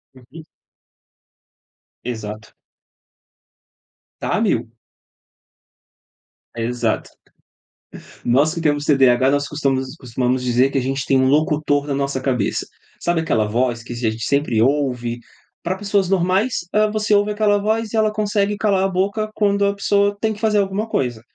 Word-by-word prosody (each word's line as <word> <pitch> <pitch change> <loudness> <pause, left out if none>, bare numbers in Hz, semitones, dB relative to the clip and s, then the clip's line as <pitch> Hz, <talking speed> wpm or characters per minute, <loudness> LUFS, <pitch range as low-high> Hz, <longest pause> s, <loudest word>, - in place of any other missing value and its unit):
Uhum. 130 +5 -13 1.6
Exato. 110 -2 -6 1.7
Tá - - -1
a - - 0
mil. - - 0 1.8
Exato. 120 +1 -2 1.1
Nós 140 +6 +3
que 170 - -4
temos 145 -2 +1
TDAH, 130 -2 +4
nós 145 0 0
costumas 135 -2 -1
costumamos 125 0 -1
dizer 125 +2 +2
que - - -1
a 135 - +2
gente 135 +1 -2
tem 135 - +3
um 130 - +3
locutor 150 0 +1
na 140 - -1
nossa 140 -1 -2
cabeça. 125 -6 -1 0.3
Sabe 175 -1 0
aquela 110 -9 +1
voz 120 +2 -1
que 120 - -10
a - - -7
gente 115 -2 -2
sempre 140 -6 +1
ouve, 125 -3 0 0.4
pra 180 +2 -2
pessoas 200 -2 0
normais, 190 +3 +1
hã, 215 0 +3
você 215 0 0
ouve 205 +1 +3
aquela 210 -1 +2
voz 220 +1 -1
e - - 0
ela 215 -1 +2
consegue 205 -1 0
calar 200 -2 +1
a - - +3
boca 200 +3 -1
quando 200 -1 +2
a 200 0 0
pessoa 200 0 +1
tem 220 -1 +1
que 210 - -11
fazer 215 -1 +2
alguma 200 +3 -1
coisa. 120 - -2
150 Hz, 150 wpm, -20 LUFS, 125-200 Hz, 1.8 s, TDAH